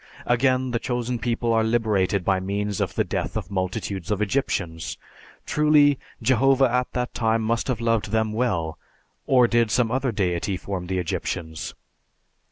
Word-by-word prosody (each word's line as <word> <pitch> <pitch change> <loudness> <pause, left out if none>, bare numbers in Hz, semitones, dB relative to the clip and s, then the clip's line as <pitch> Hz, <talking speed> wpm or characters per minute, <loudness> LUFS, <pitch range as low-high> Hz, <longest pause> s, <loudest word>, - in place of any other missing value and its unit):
Again 130 +1 +2
the 120 - 0
Chosen 120 0 -2
People 115 +1 0
are 110 0 +3
liberated 105 -5 +1
by 95 -1 +2
means 100 +1 -2
of - - -2
the - - +2
death - - -3
of 90 - -5
multitudes 95 -1 -3
of 105 -2 0
Egyptians. 100 - -2 0.5
Truly, 150 -2 +4 0.2
Jehovah 130 +2 +4
at 125 0 0
that 125 0 -2
time 115 -1 +1
must 115 +1 0
have 125 -4 -1
loved 115 -3 0
them 110 0 0
well, 90 -9 -1 0.5
or 125 -2 +5
did 115 -1 +2
some 115 0 +2
other 130 0 0
Deity 95 -2 -1
form 90 -1 -5
the 95 0 -1
Egyptians? 80 -2 -3
110 Hz, 160 wpm, -24 LUFS, 95-125 Hz, 0.5 s, or